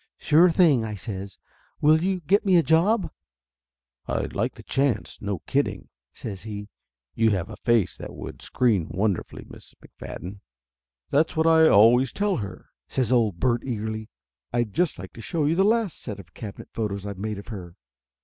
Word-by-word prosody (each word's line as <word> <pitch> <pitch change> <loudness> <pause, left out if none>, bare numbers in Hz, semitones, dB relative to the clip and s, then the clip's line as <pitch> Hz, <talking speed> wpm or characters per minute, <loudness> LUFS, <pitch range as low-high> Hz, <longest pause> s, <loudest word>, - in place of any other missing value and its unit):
"Sure 165 +4 +5
thing!" 160 -8 +4
I 110 -1 -4
says. 95 0 -6 0.4
"Will 155 +2 +5
you 185 -1 0
get 195 +7 +2
me 190 -3 +3
a 170 - +4
job?" 170 +3 +2 1.0
"I'd - - -2
like - - -1
the - - -12
chance, 135 -2 -1
no 100 -4 -3
kidding," - - -1 0.2
says 100 -4 -7
he. 105 -1 -7 0.4
"You 115 0 +3
have 100 -1 -1
a - - -7
face 115 -6 +1
that - - -8
would - - -8
screen 110 -10 +1
wonderfully, 100 -1 -2
Miss - - -13
McFadden." 95 +3 -9 0.7
"That's 155 +3 +2
what 160 0 +2
I 160 -1 +6
always 120 +4 +6
tell 205 -1 0
her!" 100 -4 -7 0.2
says 125 -3 -1
old 110 -8 +2
Bert 120 +4 +1
eagerly. 110 -3 -4 0.4
"I'd 120 -4 -1
just 175 -2 +1
like 95 +1 -9
to 115 - -10
show 160 - -1
you 150 - +2
the 190 +3 +3
last 220 -3 +1
set 105 - -6
of 85 -3 -14
cabinet 105 -3 -9
photos 100 -3 -3
I've 100 -2 -6
made 105 0 -3
of 100 - -10
her." 90 -6 -8
115 Hz, 180 wpm, -25 LUFS, 100-160 Hz, 1.0 s, I